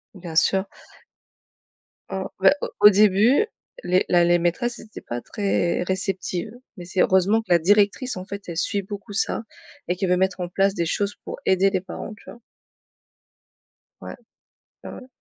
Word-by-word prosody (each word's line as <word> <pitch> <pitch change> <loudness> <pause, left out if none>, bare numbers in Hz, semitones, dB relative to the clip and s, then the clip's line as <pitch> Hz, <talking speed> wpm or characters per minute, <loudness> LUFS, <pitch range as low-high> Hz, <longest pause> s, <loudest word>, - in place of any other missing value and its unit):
Bien 175 -4 -9
sûr. 190 +3 +3 1.5
Mmh, - - -3 0.2
ben, - - +6
au - - -3
au 210 - +10
début 210 - +4 0.4
les 185 - +2
la 175 -1 +4
les 175 0 +3
maîtresses 235 +8 -1
étaient 220 - -11
pas 120 0 -5
très 195 -4 -1
réceptives 185 +1 -3 0.3
mais 175 - -8
c'est 180 +1 -1
heureusement 190 +4 +3
que 225 - -22
la 175 - +6
directrice, 205 - +2
en 185 - -7
fait, 200 0 -7
elle 170 - -6
suit 200 +4 -1
beaucoup 205 +1 -9
ça 220 - -1 0.4
et 180 - 0
qu'elle 185 0 -2
veut 180 - +3
mettre 190 0 0
en 175 - -2
place 195 +2 +1
des 170 -3 -1
choses 200 +5 -2
pour - - -7
aider 190 +1 +3
les 190 -2 -1
parents, 195 - -8
tu - - -20
vois? - - -12 1.6
Ouais. - - -8 0.7
Ouais, - - -8
ouais. 255 - -11
190 Hz, 175 wpm, -23 LUFS, 180-205 Hz, 1.6 s, au